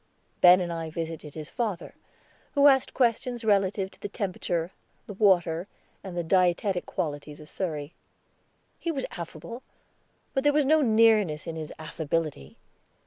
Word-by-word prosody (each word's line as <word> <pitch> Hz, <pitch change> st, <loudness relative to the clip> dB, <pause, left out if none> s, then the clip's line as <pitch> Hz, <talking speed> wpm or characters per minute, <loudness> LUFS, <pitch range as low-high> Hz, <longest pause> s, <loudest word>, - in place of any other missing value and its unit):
Ben 180 Hz, +1 st, +8 dB
and 175 Hz, -2 st, -2 dB
I 165 Hz, -1 st, -4 dB
visited 160 Hz, -2 st, -6 dB
his 155 Hz, -1 st, -7 dB
father, 215 Hz, -8 st, -3 dB, 0.6 s
who 285 Hz, 0 st, +5 dB
asked 270 Hz, -2 st, +5 dB
questions 240 Hz, -1 st, 0 dB
relative 195 Hz, -2 st, +2 dB
to -, -, -18 dB
the 205 Hz, -, -4 dB
temperature, 180 Hz, -5 st, -2 dB, 0.3 s
the 205 Hz, -, -8 dB
water, 180 Hz, -4 st, +2 dB, 0.4 s
and 185 Hz, -2 st, -7 dB
the 175 Hz, -, 0 dB
dietetic 180 Hz, +2 st, +1 dB
qualities 145 Hz, -1 st, -4 dB
of 150 Hz, -, -12 dB
Surrey. 155 Hz, -4 st, -4 dB, 0.9 s
He 335 Hz, -, -3 dB
was 275 Hz, -4 st, -2 dB
affable, 170 Hz, +7 st, -8 dB, 0.7 s
but 270 Hz, -, 0 dB
there 290 Hz, 0 st, +4 dB
was 295 Hz, -1 st, +3 dB
no 310 Hz, +3 st, +4 dB
nearness 215 Hz, -, +3 dB
in 165 Hz, -, -5 dB
his 155 Hz, -1 st, -6 dB
affability. 155 Hz, -, -3 dB
180 Hz, 145 wpm, -27 LUFS, 160-225 Hz, 0.9 s, Ben